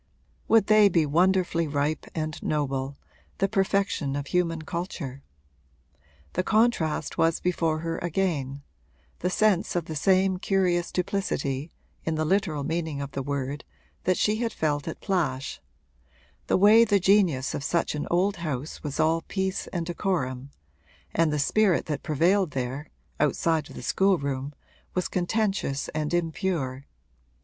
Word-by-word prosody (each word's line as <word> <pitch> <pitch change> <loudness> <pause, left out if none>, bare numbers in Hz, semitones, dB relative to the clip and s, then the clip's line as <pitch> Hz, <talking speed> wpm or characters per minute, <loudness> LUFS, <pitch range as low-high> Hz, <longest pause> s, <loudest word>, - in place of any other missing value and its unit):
Would 225 -2 +5
they 215 -1 +6
be 170 -4 +3
wonderfully 175 +1 +2
ripe 145 +1 -1
and 155 -1 -3
noble, 140 -2 -2 0.4
the 195 - +2
perfection 195 -8 0
of 140 -1 -3
human 165 0 0
culture? 155 -6 -5 1.1
The - - +1
contrast 215 -8 +1
was 165 0 +3
before 165 -3 0
her 165 0 -3
again, 150 -6 -1 0.6
the 180 - 0
sense 195 -2 +2
of 175 -2 0
the 160 - -6
same 185 +4 +3
curious 180 -3 +1
duplicity 165 -6 -2 0.3
(in 160 - -1
the 155 0 0
literal 160 -5 +1
meaning 160 -1 -2
of 140 0 -5
the 135 - -3
word) 140 +1 -3 0.4
that 185 0 +2
she 210 +1 +2
had 230 0 -1
felt 145 -4 -1
at 165 - -5
Plash 145 - -1 0.9
the - - +3
way 210 +4 +7
the 205 -3 +3
genius 180 -8 +3
of 140 - -3
such 170 +3 0
an 150 - -3
old 185 +3 +2
house 155 -3 -4
was 150 0 -5
all 160 +1 +3
peace 190 -1 -2
and 170 -2 -3
decorum 150 -7 -2 0.6
and 165 -2 +2
the 150 - 0
spirit 190 +5 +2
that 150 -3 -3
prevailed 170 +2 +2
there, 130 +3 -3 0.3
outside 155 +2 +1
of - - -11
the - - -8
schoolroom, 140 -7 0 0.4
was 180 - 0
contentious 195 -6 -1
and 150 -1 -2
impure. 165 -6 -1
165 Hz, 145 wpm, -26 LUFS, 145-190 Hz, 1.1 s, way